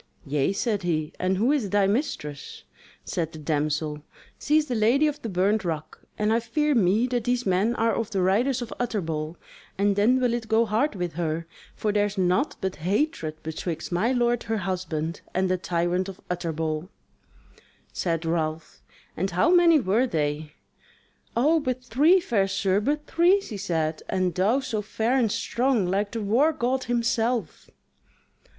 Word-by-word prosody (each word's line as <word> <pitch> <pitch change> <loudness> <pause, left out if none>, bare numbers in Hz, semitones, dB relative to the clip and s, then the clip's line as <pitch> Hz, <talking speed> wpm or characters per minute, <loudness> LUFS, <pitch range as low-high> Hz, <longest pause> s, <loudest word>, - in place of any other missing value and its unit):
"Yea," 140 +3 +1
said 205 +1 -1
he, 155 -4 -1
"and 185 +1 +1
who 235 +7 +2
is 265 -9 0
thy 205 0 +3
mistress?" 195 - -3 0.4
Said 165 -2 -3
the - - -8
damsel: 150 0 -1 0.4
"She 300 - +2
is 310 - +2
the 255 - -3
Lady 240 +7 +3
of 300 -1 -1
the 230 - -4
Burnt 195 +3 +1
Rock; 160 -3 -4 0.2
and 210 +1 +1
I 230 - +3
fear 295 +6 0
me 215 0 +3
that 245 -2 -2
these 245 0 0
men 195 +5 +2
are 230 -1 +1
of 230 -2 -2
the 195 -4 0
Riders 240 +7 +2
of 230 - -7
Utterbol; 165 -9 -2 0.4
and 200 0 +2
then 230 +6 +3
will 250 -2 +1
it 235 -2 -3
go 225 +1 +3
hard 225 +5 0
with 175 -3 -3
her; 165 0 -2 0.3
for 210 - -1
there 205 0 +2
is 205 0 -8
naught 185 +10 +1
but 190 -1 -2
hatred 175 - -1
betwixt 160 +1 -4
my 205 +8 +1
lord 240 -2 +1
her 225 -1 -2
husband 175 -4 -3
and 185 0 +1
the 185 - +2
tyrant 175 +2 -1
of 190 - -10
Utterbol." 160 -1 -2 1.0
Said 165 -2 -1
Ralph: 160 -1 -2 0.3
"And 190 +4 -1
how 185 - +2
many 345 -3 +6
were 230 +3 +2
they?" 150 -4 -2 0.8
"O 305 +7 +4
but 255 -3 -3
three, 295 +10 +4
fair 210 - +1
sir, 195 0 +1
but 295 +7 -1
three," 350 +4 +4
she 230 - -7
said; 160 -5 -1
"and 185 -2 0
thou 210 +10 +2
so 220 -5 -2
fair 220 +4 -1
and 235 -5 +2
strong, 240 -3 +1
like 200 +3 0
the 225 -2 -3
war 255 +10 +3
god 260 -2 -1
himself." 235 -3 -1
205 Hz, 175 wpm, -25 LUFS, 175-245 Hz, 1.0 s, many